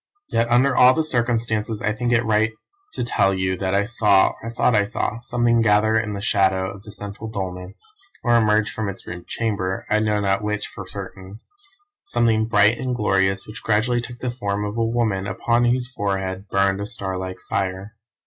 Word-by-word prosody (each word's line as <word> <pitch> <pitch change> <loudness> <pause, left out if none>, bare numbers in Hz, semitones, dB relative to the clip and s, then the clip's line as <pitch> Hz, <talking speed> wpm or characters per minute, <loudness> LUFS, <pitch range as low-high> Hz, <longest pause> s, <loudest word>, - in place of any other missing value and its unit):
Yet 115 +1 +1
under 130 +3 +3
all 125 0 +7
the 160 - +1
circumstances 115 -5 0
I 105 - 0
think 120 +2 -2
it 120 -1 +3
right 110 0 +2 0.4
to - - -2
tell 95 -4 +2
you 95 0 0
that 95 0 -1
I 100 - +3
saw, 105 -3 +3
or 115 - -5
thought 115 +1 +1
I 105 - +4
saw, 105 +2 -2
something 120 -1 +2
gather 110 0 +3
in 110 -2 -3
the 100 - -5
shadow 95 -3 +1
of 100 - -11
the 105 - -11
central 105 +2 -8
dolmen, 95 -2 -5 0.5
or 120 - +2
emerge 110 -1 +3
from 110 -2 -3
its 100 - -9
rude 90 0 -8
chamber 100 -4 -2
I 110 - +4
know 105 -1 +1
not 95 -1 +1
which 105 0 -2
for - - -9
certain 95 +2 -9 0.6
something 115 -2 +1
bright 105 +1 +4
and 130 -1 -2
glorious 95 -3 +1
which 105 +1 -9
gradually 115 +3 +1
took 120 +1 -8
the 125 0 -3
form 105 -4 -2
of 105 +1 -4
a 115 - +1
woman 115 -4 0
upon 115 +5 +1
whose 125 +1 0
forehead 95 -2 -3
burned 100 0 +1
a 100 - -4
star 95 -4 -4
like 95 0 -5
fire. 95 +2 -3
105 Hz, 195 wpm, -22 LUFS, 100-115 Hz, 0.6 s, all